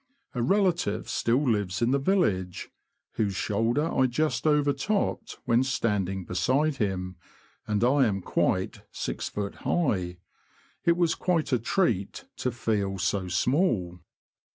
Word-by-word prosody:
A 125 - -2
relative 180 - +1
still 130 +5 +1
lives 105 -5 0
in 120 +1 +2
the 140 - +3
village, 105 - 0 0.5
whose 100 -3 0
shoulder 115 - 0
I 130 -1 +3
just 155 +5 0
overtopped 150 +9 0
when 120 0 +3
standing 100 -8 -1
beside 130 - +1
him, 90 -4 -2 0.5
and 105 +1 0
I 130 +1 +4
am 100 -2 -1
quite - - 0
6ft. 100 -1 -4
high. 95 - 0 0.7
It 170 0 +4
was 170 -2 +3
quite 170 -5 0
a 125 - +3
treat 115 - 0
to 125 - -1
feel 105 -4 -1
so 95 +1 -1
small. 95 - +1
120 Hz, 130 wpm, -27 LUFS, 95-150 Hz, 0.7 s, I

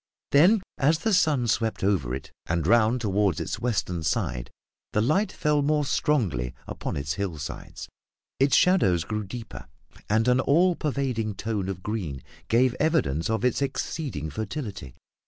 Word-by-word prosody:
Then, 185 +8 +5 0.2
as 150 +3 +3
the 215 +7 0
sun 150 -8 +3
swept 115 -2 0
over 80 -12 +1
it 70 - -9 0.2
and 85 -1 0
round 115 +4 +3
toward 100 -5 +1
its - - -3
western 100 -8 -1
side, - - -1 0.4
the - - +2
light 185 - +2
fell 150 -1 +1
more 150 +1 +1
strongly 85 - 0
upon - - -5
its 70 +2 -2
hillsides; 80 -7 -5 0.5
its 135 +1 +4
shadows 95 - +4
grew 105 +3 -3
deeper, 115 +4 -8 0.4
and 110 +3 +2
an 125 +1 +4
all 170 +7 +3
pervading 130 -9 -2
tone 100 -2 -2
of 90 -2 -5
green 90 - -4 0.2
gave 120 +2 +3
evidence 140 - +1
of 110 +2 0
its 125 +2 +1
exceeding 135 - -3
fertility. 105 - -5
115 Hz, 150 wpm, -26 LUFS, 90-140 Hz, 0.5 s, Then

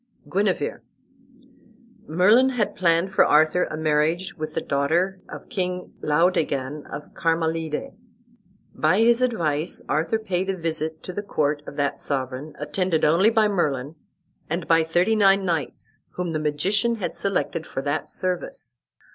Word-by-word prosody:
GUENEVER 205 - -1 1.3
Merlin 210 +11 +5
had 245 -5 -1
planned 170 +1 +2
for - - +6
Arthur 155 +4 +4
a 155 - -6
marriage 160 +4 +1
with 155 -1 -6
the - - +1
daughter 170 +7 0
of - - -9
King 180 -1 -3
Laodegan 150 -3 0
of 145 - -8
Carmalide. 165 - -1 0.8
By 190 - +2
his 235 +1 +4
advice 170 -11 0
Arthur 165 +8 +1
paid 190 -4 -2
a 190 - -1
visit 160 -1 -3
to 185 - -6
the 205 - -3
court 150 -7 -1
of - - -8
that 140 -1 -1
sovereign, 135 +2 -3
attended 170 +2 0
only 170 +8 +5
by 220 -2 +3
Merlin 150 -8 -1 0.6
and 170 +2 -3
by 165 0 +5
thirty 175 +7 +2
nine 195 -2 +4
knights 165 -7 -3
whom 180 -2 -3
the 155 - -1
magician 190 +10 +1
had 205 -5 -4
selected 180 -4 -2
for 135 - -4
that 145 +1 -2
service. 170 -9 -4
165 Hz, 145 wpm, -24 LUFS, 150-190 Hz, 1.3 s, for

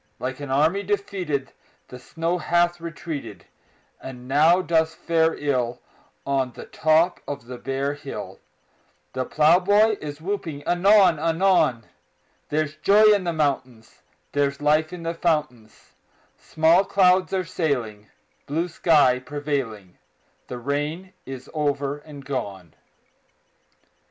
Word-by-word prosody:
Like 130 +2 -5
an 145 -2 -7
army 155 +9 +2
defeated 185 -8 -3 0.4
The 125 - -10
snow 165 +6 -3
hath 175 +1 +1
retreated, 150 - -7 0.6
And 125 -1 -9
now 160 +7 +4
doth 160 -2 +1
fare 165 -1 +1
ill 125 -4 -1 0.5
On 135 -2 0
the - - -10
top 160 +3 +2
of 140 -5 -6
the 125 0 -9
bare 135 +2 -2
hill; 145 - -8 0.7
The 130 0 -2
plowboy 195 - +3
is 145 -1 -7
whooping 165 -5 -4
anon 185 -2 +4
anon: 165 - +2 0.6
There's 155 0 -2
joy 210 +6 +5
in 200 -3 0
the 170 - -1
mountains; 130 -7 -3 0.3
There's 140 -1 0
life 155 +2 +2
in 180 -2 -8
the 165 0 -2
fountains; 150 -10 -3 0.4
Small 165 +4 +3
clouds 185 -1 +3
are 185 -1 -1
sailing, 120 - -3 0.4
Blue 165 +5 -1
sky 150 -7 +3
prevailing; 130 -9 -5 0.5
The 125 - -6
rain 145 +8 -3
is 130 0 -8
over 145 -2 -1
and 145 -2 -12
gone! 100 - -5
150 Hz, 120 wpm, -23 LUFS, 135-175 Hz, 0.7 s, joy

